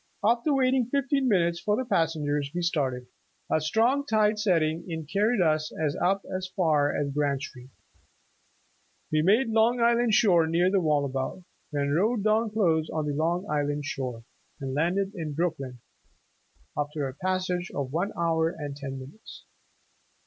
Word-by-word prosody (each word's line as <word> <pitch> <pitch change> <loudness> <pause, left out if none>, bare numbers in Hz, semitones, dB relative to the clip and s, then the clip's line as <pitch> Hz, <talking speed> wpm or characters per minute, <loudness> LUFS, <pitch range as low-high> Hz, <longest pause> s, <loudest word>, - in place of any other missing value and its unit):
After 235 +7 +2
waiting 260 -3 +2
fifteen 275 0 0
minutes 170 -6 +2
for 210 +3 0
the 260 - -2
passengers, 150 - 0
we 175 - -1
started. 135 -7 -1 0.5
A 155 - +2
strong 230 - +2
tide 215 -4 +2
setting 165 -5 +1
in 160 -2 -4
carried 205 +7 +1
us 155 -2 +1 0.3
up 195 +2 +1
as 185 0 -3
far 155 -6 +2
as 140 -1 -2
Grand 140 -1 0
Street. 130 -2 -10 1.4
We 155 0 +3
made 220 +9 +3
Long 225 +2 +3
Island 235 -1 +3
shore 175 -7 +4
near 175 +3 +2
the 195 -1 +2
Wallabout, 145 +2 -1 0.3
then 140 -1 -1
rowed 205 +7 +1
down 220 +1 +2
close 165 -7 +1
on 155 -1 -2
the 145 - -2
Long 170 +5 0
Island 145 -1 -1
shore, 130 -4 -4 0.4
and 135 -2 -4
landed 180 +7 0
in 160 -6 -5
Brooklyn, 135 -7 -3 0.9
after 145 -1 -2
a 130 - -6
passage 185 +2 -2
of 135 -2 -3
one 175 +5 0
hour 165 -1 +1
and 145 -4 -6
ten 135 -1 -6
minutes. 135 +11 -12
170 Hz, 155 wpm, -27 LUFS, 145-210 Hz, 1.4 s, shore